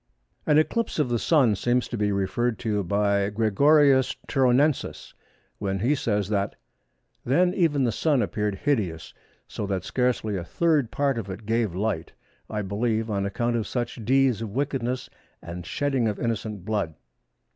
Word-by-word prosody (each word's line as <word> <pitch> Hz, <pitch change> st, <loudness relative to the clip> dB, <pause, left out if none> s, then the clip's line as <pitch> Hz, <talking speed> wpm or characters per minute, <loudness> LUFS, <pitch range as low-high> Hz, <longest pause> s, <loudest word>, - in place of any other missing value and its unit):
An 150 Hz, -, +5 dB
eclipse 230 Hz, +9 st, +1 dB
of 150 Hz, -5 st, +1 dB
the 120 Hz, -1 st, 0 dB
Sun 130 Hz, -, +3 dB
seems 125 Hz, +3 st, +1 dB
to -, -, -5 dB
be 105 Hz, -2 st, 0 dB
referred 100 Hz, +4 st, 0 dB
to 105 Hz, -3 st, -1 dB
by 100 Hz, +1 st, +1 dB
Gregorius 130 Hz, +6 st, +4 dB
Turonensis, 135 Hz, +2 st, +1 dB, 0.5 s
when 95 Hz, -1 st, -1 dB
he 120 Hz, +9 st, +2 dB
says 105 Hz, -8 st, 0 dB
that:—"Then 130 Hz, -, -2 dB
even 155 Hz, -7 st, +2 dB
the 120 Hz, -, +2 dB
Sun 145 Hz, +2 st, +1 dB
appeared 105 Hz, -2 st, -2 dB
hideous, 100 Hz, -, -2 dB, 0.3 s
so 105 Hz, -, -5 dB
that 95 Hz, -2 st, -2 dB
scarcely 125 Hz, -4 st, 0 dB
a 90 Hz, -, -4 dB
third 150 Hz, -, +1 dB
part 140 Hz, -3 st, 0 dB
of 100 Hz, -3 st, -6 dB
it 100 Hz, +3 st, -7 dB
gave 110 Hz, -4 st, 0 dB
light, 95 Hz, -4 st, -2 dB, 0.4 s
I 105 Hz, -1 st, -2 dB
believe 110 Hz, +3 st, -1 dB
on 100 Hz, -1 st, 0 dB
account 120 Hz, +4 st, -1 dB
of 115 Hz, -2 st, -1 dB
such 120 Hz, -2 st, -3 dB
deeds 130 Hz, -1 st, +3 dB
of 115 Hz, -, -4 dB
wickedness 130 Hz, +1 st, -2 dB, 0.3 s
and 85 Hz, 0 st, -8 dB
shedding 135 Hz, -2 st, 0 dB
of 105 Hz, -, -2 dB
innocent 110 Hz, -4 st, -3 dB
blood." 100 Hz, -7 st, -2 dB
115 Hz, 155 wpm, -25 LUFS, 100-135 Hz, 0.5 s, An